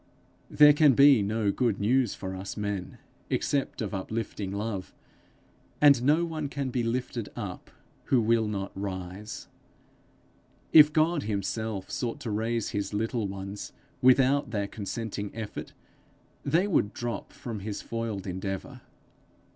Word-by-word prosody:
There 150 0 +7
can 150 -2 +5
be 140 -3 +7
no 105 0 0
good 115 -3 0
news 120 +2 +2
for 95 0 -5
us 95 +3 -6
men, 100 -3 -3 0.3
except 140 -4 -1
of 105 - -4
uplifting 105 0 -4
love, 100 -2 -4 0.8
and 140 -4 +6
no 150 +6 +3
one 155 -3 -4
can 140 -2 -3
be 125 - 0
lifted 120 -1 -2
up 100 -6 -6 0.4
who 130 - +3
will 115 0 +2
not 100 -2 -3
rise. 95 +1 -6 1.3
If 150 -1 +9
God 155 +1 +2
himself 105 -1 -3
sought 120 -2 -3
to 115 - -4
raise 115 +1 -1
his 100 0 -3
little 115 0 -1
ones 100 +1 -7 0.3
without 130 +1 +4
their 105 -3 -1
consenting 105 0 -4
effort, 110 -2 -6 0.7
they 165 +7 +2
would 145 - +1
drop 120 -4 -4
from 115 -4 -6
his 100 +1 -5
foiled 115 -4 -4
endeavour. 95 0 -5
110 Hz, 135 wpm, -28 LUFS, 100-130 Hz, 1.3 s, If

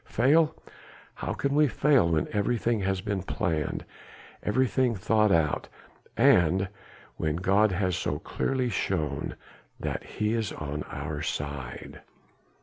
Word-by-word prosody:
Fail? 155 +6 +3 0.6
How - - -4
can 140 0 -1
we 150 +1 +5
fail 135 - +3
when 80 -2 +1
everything 115 +2 +1
has 95 -1 -1
been 100 0 -2
planned, 85 - -2 0.6
everything 125 +1 +1
thought 105 +2 +2
out? 80 -4 +2 0.5
and 90 +2 +4 0.5
when 80 -1 -1
God 100 +4 +3
has 90 -1 0
so 75 -4 -1
clearly 130 - -1
shown 75 - -2 0.4
that - - -3
He 105 +1 -2
is 115 -3 -1
on 75 0 -4
our - - -4
side?" 70 -4 -5
100 Hz, 125 wpm, -28 LUFS, 80-120 Hz, 0.6 s, we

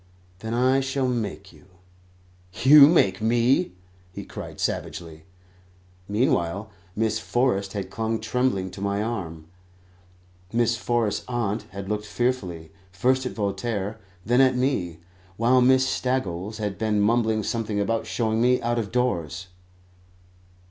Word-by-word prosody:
"Then 110 +3 -4
I 130 +2 +3
shall 135 0 -1
make 105 -5 -3
you." - - -19 1.0
"You 140 +1 +9
make 105 - +3
me?" 115 -2 +2 0.4
he - - -8
cried - - -9
savagely. 80 -2 -4 0.8
Meanwhile 100 -2 0 0.2
Miss 110 0 0
Forrest 110 -5 0
had 100 -3 -5
clung 110 0 -2
tremblingly 110 -4 -1
to 100 - -9
my 100 +1 -1
arm; 85 -9 -5 1.1
Miss 115 0 +2
Forrest's 115 -2 -1
aunt 115 -3 -2
had 100 0 -7
looked 105 0 -3
fearfully, 95 -12 -2 0.2
first 130 +7 +1
at - - -6
Voltaire, 105 +1 -3 0.3
then 120 +5 +4
at 130 -1 +4
me; 110 - -1 0.4
while 125 +3 +4
Miss 130 +1 +5
Staggles 110 -7 -2
had 105 -3 -4
been 110 -1 +1
mumbling 110 0 +2
something 110 -1 -2
about 115 +3 -1
showing 110 -1 0
me 125 +1 +3
out 120 0 0
of 105 -3 -4
doors. 95 -8 -1
110 Hz, 130 wpm, -24 LUFS, 100-125 Hz, 1.1 s, You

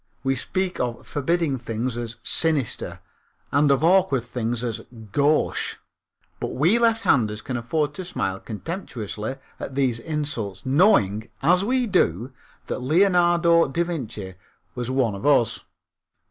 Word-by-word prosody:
We 135 0 +2
speak 185 +8 -2
of 120 -1 -3
forbidding 150 -1 0
things 115 +1 -3
as 120 -1 -4
"sinister," 155 -8 0 0.5
and 145 +1 +3
of 140 +2 +3
awkward 175 -7 +4
things 120 -1 -3
as 115 -3 -3 0.3
"gauche," 145 +4 +1 0.6
but - - -4
we 170 - +3
lefthanders 140 - +2
can 130 - -4
afford 145 +5 -1
to 185 - -6
smile 95 - -3
contemptuously 110 - -5 0.2
at 135 - -6
these 130 -4 +1
insults 145 -9 -3
knowing, 130 - +3
as 180 +5 +4
we 250 +3 +1
do, 120 - +1 0.3
that - - -3
Leonardo 170 +2 +4
da 165 +6 0
Vinci 120 - -5 0.4
was 125 0 -4
one 130 -5 +1
of 100 - -7
us. 135 -6 +2
135 Hz, 130 wpm, -24 LUFS, 115-170 Hz, 0.6 s, awkward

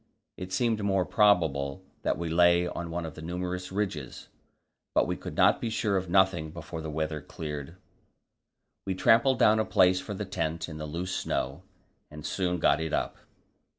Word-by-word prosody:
It 90 0 -7
seemed 110 +2 +1
more 95 -2 +2
probable 85 -7 +2 0.2
that - - 0
we 85 - -3
lay 85 +1 +4
on 85 -1 -5
one 85 0 -3
of 80 - -6
the 80 - -10
numerous 90 +2 -4
ridges; 95 -10 -4 0.7
but - - +4
we - - -2
could - - -7 0.2
be 115 - -2
sure 110 -2 0
of 95 -2 -1
nothing 90 -3 +3
before 80 0 -7
the 80 - -5
weather 75 0 -2
cleared. 75 +1 -6 1.1
We 95 - -1
trampled 115 +7 +4
down 110 -1 +5
a - - +3
place 90 -3 +4
for 105 +2 -6
the 105 - -4
tent 85 -4 -3
in 80 -2 -8
the 75 - -4
loose 90 +4 -3
snow, 70 +6 -2 0.5
and 75 0 -10
soon 90 -2 -1
got - - +3
it 80 -1 -3
up. - - -1
90 Hz, 180 wpm, -28 LUFS, 80-95 Hz, 1.1 s, down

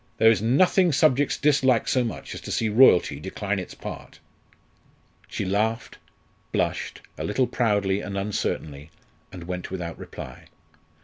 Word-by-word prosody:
There 110 0 +6
is 105 -4 +1
nothing 175 - +3
subjects 145 -1 +2
dislike 135 -5 +2
so 130 - +2
much 115 - -6
as - - -8
to - - -7
see 110 - 0
royalty 105 - +5
decline 95 +3 -3
its 90 - -8
part." - - -9 1.1
She - - -4
laughed, 110 +5 -1 0.5
blushed, - - -2 0.2
a - - -3
little 125 +5 +1
proudly 100 -5 0
and 100 -1 -5
uncertainly, 80 -7 -3 0.4
and 90 -2 -9
went 90 +1 -5
without 85 -3 -6
reply. 65 - -9
105 Hz, 140 wpm, -25 LUFS, 95-125 Hz, 1.1 s, There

